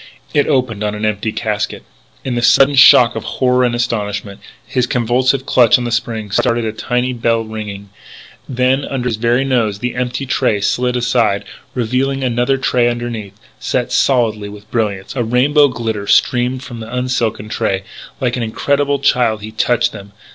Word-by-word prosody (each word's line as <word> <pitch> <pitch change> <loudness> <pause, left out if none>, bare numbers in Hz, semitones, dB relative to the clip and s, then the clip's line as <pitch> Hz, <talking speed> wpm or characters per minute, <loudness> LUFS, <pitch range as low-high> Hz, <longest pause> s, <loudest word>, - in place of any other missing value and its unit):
It 145 -1 +2
opened 125 -7 0
on 105 0 -2
an 105 +1 -3
empty 105 +1 -1
casket. 105 -2 -3 0.4
In 130 - -2
the 120 - -1
sudden 135 +3 +5
shock 125 -3 +7
of - - -4
horror 125 0 +1
and 120 -1 +1
astonishment, 105 -4 -3 0.3
his 125 -1 -1
convulsive 125 +3 +1
clutch 120 -5 +5
on 125 - -4
the 120 - -3
spring 110 -2 -2
started 115 +3 +1
a 110 - -1
tiny 125 +2 -1
bell 115 -1 0
ringing. 105 -2 -7 0.6
Then, 130 +2 +1
under 130 -3 -3
his 115 -3 -1
very 120 +4 +1
nose, 115 -6 0
the 120 +3 -3
empty 125 +2 -3
tray 110 -5 0
slid 125 +4 0
aside 120 -4 +1 0.3
revealing 130 +3 -1
another 125 +2 +1
tray 125 -2 +1
underneath, 115 -4 -5 0.2
set 125 -2 -2
solidly 110 -6 +1
with 105 +1 -13
brilliants. 105 -1 -2
A 120 - 0
rainbow 140 +6 +3
glitter 110 -5 -4
streamed 125 +3 +2
from 120 -2 -8
the 110 - -7
unset - - -9
gems 125 - -1
in 125 - -2
the - - -5
silken 110 -3 -1
tray. 100 -4 -1 0.4
Like 125 -3 0
an 125 - -3
incredulous 140 +5 0
child 110 -4 +1
he 110 - -7
touched 120 +2 +1
them. 100 -1 -11
120 Hz, 185 wpm, -16 LUFS, 110-125 Hz, 0.6 s, shock